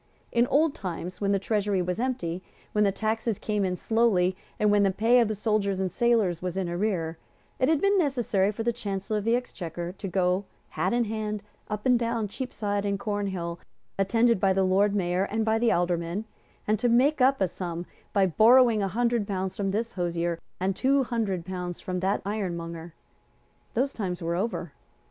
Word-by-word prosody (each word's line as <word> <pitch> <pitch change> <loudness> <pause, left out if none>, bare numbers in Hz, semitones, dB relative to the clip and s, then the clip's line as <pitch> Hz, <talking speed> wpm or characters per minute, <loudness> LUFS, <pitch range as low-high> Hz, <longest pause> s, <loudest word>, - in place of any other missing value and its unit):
In 235 +1 +3
old 300 +3 +3
times, 180 0 -6
when 200 0 +1
the 200 - +3
Treasury 205 -1 0
was 180 +2 -1
empty, 185 -9 -2 0.3
when 210 - +2
the 200 - +3
taxes 220 +1 -1
came 210 -2 -1
in 185 -1 0
slowly, 195 -4 +2 0.2
and 210 -1 +3
when 205 0 +4
the 200 - +4
pay 225 +6 +4
of 235 - +4
the 215 - -2
soldiers 200 -2 0
and 190 -1 -1
sailors 215 -6 +2
was 180 0 -3
in 190 -2 -1
arrear, 170 -3 -1 0.4
it 255 - +3
had 320 -2 +3
been 395 +3 +3
necessary 240 - +1
for 225 +2 -4
the 235 +1 +1
Chancellor 210 -1 -3
of 205 - -7
the 230 +1 +3
Exchequer 175 -8 -4
to 195 +1 -7
go, 185 +1 +1 0.2
hat 180 +5 -1
in 240 0 +2
hand, 215 -1 -3 0.3
up 210 0 -4
and 250 -2 +4
down 230 -2 -1
Cheapside 205 -3 -3
and 200 -1 0
Cornhill, 195 -6 -3 0.4
attended 225 +3 +3
by 195 -1 +3
the 190 0 +2
Lord 200 +2 +3
Mayor 180 0 +1
and 220 +2 -1
by 220 0 +2
the 235 0 +3
Aldermen, 175 +3 0 0.4
and 215 0 +2
to 245 - +2
make 260 +5 +3
up 270 +2 +4
a 190 - +3
sum 175 -1 -5 0.3
by 200 -2 +3
borrowing 225 +4 +5
a 195 - +1
hundred 235 +1 0
pounds 190 -1 -2
from 195 -1 -1
this 220 +4 -2
hosier, 170 -1 -1 0.2
and 190 +1 0
two 270 +4 +3
hundred 215 -8 -2
pounds 180 -2 -5
from 180 -1 -3
that 190 +2 0
ironmonger. 170 -5 -4 0.8
Those 265 +4 +1
times 180 -5 -3
were 170 0 -2
over. 180 -4 -2
200 Hz, 195 wpm, -27 LUFS, 180-230 Hz, 0.8 s, borrowing